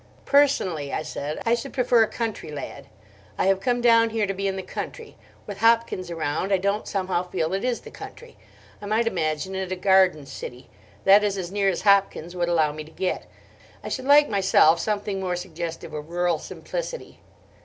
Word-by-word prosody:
"Personally," 190 - +2
I - - -2
said, 150 -1 -5
"I 230 - +3
should 240 +3 -3
prefer 245 -3 +3
a 220 - +4
country 225 -8 -4
lad. 145 -1 -7 0.5
I - - +1
have 195 0 +3
come 245 +3 0
down 230 -1 +5
here 220 -1 0
to 195 - -2
be 195 +1 -2
in 195 - -1
the 190 - -5
country. 455 - -7 0.3
With 205 -2 -7
Hopkins 225 -5 +2
around, 165 +3 -2
I 195 - +4
don't 200 +3 -1
somehow 190 -3 -1
feel 160 0 -1
it 195 - -1
is 250 -2 -1
the - - -12
country. 480 0 -11 0.5
I 205 - -7
might 220 +3 +1
imagine 160 -3 -1
it 190 -1 -4
a - - 0
garden 185 -5 +3
city: 125 -1 -9 0.3
that 200 +2 +7
is 200 -1 0
as 180 -2 -4
near 200 -1 +1
as 185 - -2
Hopkins 195 -4 +2
would 175 -1 0
allow 160 -3 +2
me 155 +1 -7
to 155 - -15
get. 185 +2 -3 0.6
I - - -5
should 260 - -4
like 290 +1 +6
myself 190 -5 +4
something 205 -2 -2
more 185 -2 -2
suggestive 170 -2 -6
of 150 +1 -6
rural 175 -2 0
simplicity." - - -6
190 Hz, 195 wpm, -24 LUFS, 170-225 Hz, 0.6 s, that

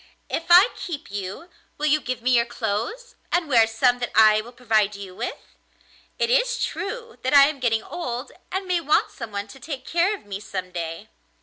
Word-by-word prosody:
If 330 - -2
I 360 +7 +8
keep 320 - -6
you, 200 - -6 0.3
will 300 - -2
you 305 0 +3
give 250 -3 -4
me 255 - +2
your 235 -1 +4
clothes 235 - -3 0.2
and 350 -2 +1
wear 230 -5 +5
some 245 +2 +2
that 245 - -2
I 215 0 +6
will 235 +3 -12
provide 220 -4 +1
you 195 -2 -9
with? - - -4 0.8
It 465 - +1
is - - +2
true 460 +3 -6
that 260 +3 +1
I 280 0 +9
am 300 -2 -4
getting 225 -3 +1
old 250 -8 -5 0.2
and 380 +1 -2
may 360 -2 0
want 300 0 +2
someone 210 -4 -6
to 270 - -12
take 265 -1 -6
care 345 +5 +1
of 395 - -15
me 200 -1 -5
some 185 -3 -6
day. 170 +4 -5
250 Hz, 200 wpm, -24 LUFS, 215-335 Hz, 0.8 s, I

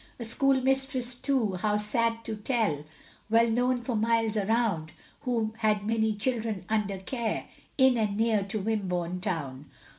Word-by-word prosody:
A - - -4
schoolmistress 265 0 +1
too, 245 -7 0
how 210 +2 +1
sad 230 +2 +1
to 220 - -3
tell, 210 - -1 0.4
Well 230 +1 +5
known 245 +2 +2
for 240 -1 -2
miles 225 0 +1
around, 205 -6 0 0.3
Who 225 -3 0
had 210 -2 +1
many 220 -1 +1
children 220 -4 -2
under 210 -3 0
care, 225 +4 -3 0.3
In 260 -2 +5
and 205 -2 0
near 225 -2 +2
to 210 +2 -3
Wimborne 180 -4 -2
town. 140 -6 -3
220 Hz, 145 wpm, -28 LUFS, 205-235 Hz, 0.4 s, Well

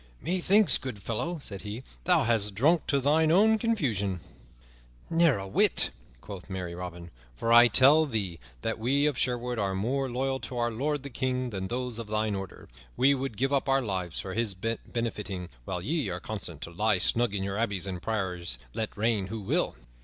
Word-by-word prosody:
"Methinks, 185 +3 +4
good 130 -5 -5
fellow," 125 - -3
said 100 -8 -7
he, 105 +4 -6 0.2
"thou 175 -4 +4
hast 110 -4 +1
drunk 155 - +3
to 140 - +2
thine 155 +4 +3
own 220 +5 +5
confusion." 115 - 0 0.9
"Never 165 -6 +4
a 95 0 -6
whit," 95 - +3 0.3
quoth 100 -2 -9
merry 90 -2 -4
Robin, 85 -1 -7 0.2
"for 115 - +1
I 120 +1 +9
tell 145 +6 +6
thee 100 - -3 0.2
that 115 - -2
we 135 +6 +2
of 150 -2 +1
Sherwood 125 -1 -1
are 95 -2 0
more 130 +7 -1
loyal 130 +2 -1
to 125 - -6
our 120 0 0
lord 140 +5 -2
the 140 - -7
King 130 0 -2
than 95 -2 -4
those 125 0 -3
of 115 - -6
thine 110 0 0
order. 95 -2 -7 0.3
We 135 +2 +5
would 135 -5 -4
give 135 +5 0
up 140 -1 +1
our 135 0 +3
lives 95 -6 -3
for 95 - -5
his 110 -3 -1
benefiting, 105 -3 -4 0.2
while 90 -2 -4
ye 150 - 0
are 90 0 -3
content 85 -5 -6
to 85 - -6
lie 105 +3 +2
snug 115 +3 +1
in 95 - -1
your 100 +1 -3
abbeys 100 -5 -1
and 90 -3 -5
priories 90 - -2 0.2
let 110 -1 -4
reign 105 -3 +1
who 110 +3 -5
will." 100 - 0
115 Hz, 190 wpm, -28 LUFS, 95-135 Hz, 0.9 s, I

